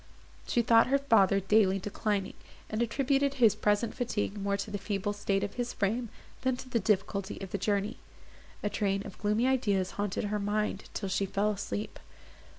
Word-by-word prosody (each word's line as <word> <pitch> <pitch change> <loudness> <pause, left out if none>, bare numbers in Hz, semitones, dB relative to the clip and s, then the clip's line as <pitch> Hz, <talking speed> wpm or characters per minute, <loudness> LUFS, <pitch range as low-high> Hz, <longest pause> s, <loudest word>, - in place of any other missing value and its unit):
She 240 - +2
thought 230 0 +5
her 275 +2 +3
father 210 -8 +4
daily 195 0 +3
declining, 200 0 -2 0.4
and 215 +1 -1
attributed 275 +3 +1
his 235 -6 +5
present 210 +2 +1
fatigue 225 -4 -2
more 200 0 -1
to 200 +1 -5
the 205 - -3
feeble 205 0 -2
state 200 -1 0
of 205 0 -3
his 245 -1 -3
frame, 225 +4 -1 0.3
than 260 -1 +1
to 255 - -9
the 245 -2 0
difficulty 200 -1 0
of 195 -2 -7
the 200 - -2
journey. 205 0 0 0.7
A 205 - +1
train 195 -1 0
of 195 - -10
gloomy 210 +3 +1
ideas 205 -8 +1
haunted 205 -2 -2
her 210 0 -1
mind, 205 0 -1
till 200 - -2
she 195 +1 0
fell 205 +2 +1
asleep. 205 +1 -4
205 Hz, 180 wpm, -30 LUFS, 200-230 Hz, 0.7 s, thought